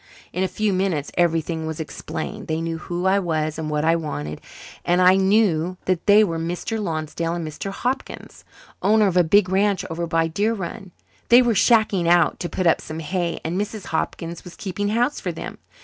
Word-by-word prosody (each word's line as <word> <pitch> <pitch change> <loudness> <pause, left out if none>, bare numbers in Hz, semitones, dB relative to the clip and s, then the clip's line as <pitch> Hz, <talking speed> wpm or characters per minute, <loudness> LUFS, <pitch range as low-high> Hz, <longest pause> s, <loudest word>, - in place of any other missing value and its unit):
In 180 - -2
a - - +1
few 215 +1 -1
minutes 185 -6 -1
everything 165 -2 0
was 160 0 -5
explained. 160 0 -6
They 160 0 -1
knew 165 0 -3
who 175 +1 -4
I 190 +1 +4
was 155 -4 -2
and 155 -1 -3
what 150 0 0
I 165 +1 +4
wanted, 75 - -4 0.4
and 175 +1 +2
I 185 +1 +6
knew 190 -3 +2
that 185 0 -1
they 210 +1 +7
were 165 -5 -1
Mr. 175 +7 -3
Lonsdale 165 -1 -2
and 170 -2 -4
Mr. 155 +6 -5
Hopkins, 250 +7 -4 0.4
owners 210 +1 +4
of 180 - -1
a 180 - +6
big 195 +4 +4
ranch 195 +1 +1
over 170 +1 -3
by 165 0 +1
Deer 205 +8 0
Run. 190 +1 -6 0.4
They 245 +2 +8
were 240 -1 +2
'shacking 215 -5 +3
out' 175 0 +3
to 175 - -3
put 185 - -2
up 165 - +4
some 155 - -7
hay 170 +2 -2
and 175 +5 -1
Mrs. 210 -2 -5
Hopkins 165 +1 -3
was 180 - -11
keeping 205 +1 -3
house 240 +6 +1
for - - -3
them. - - -8
175 Hz, 200 wpm, -22 LUFS, 165-200 Hz, 0.4 s, They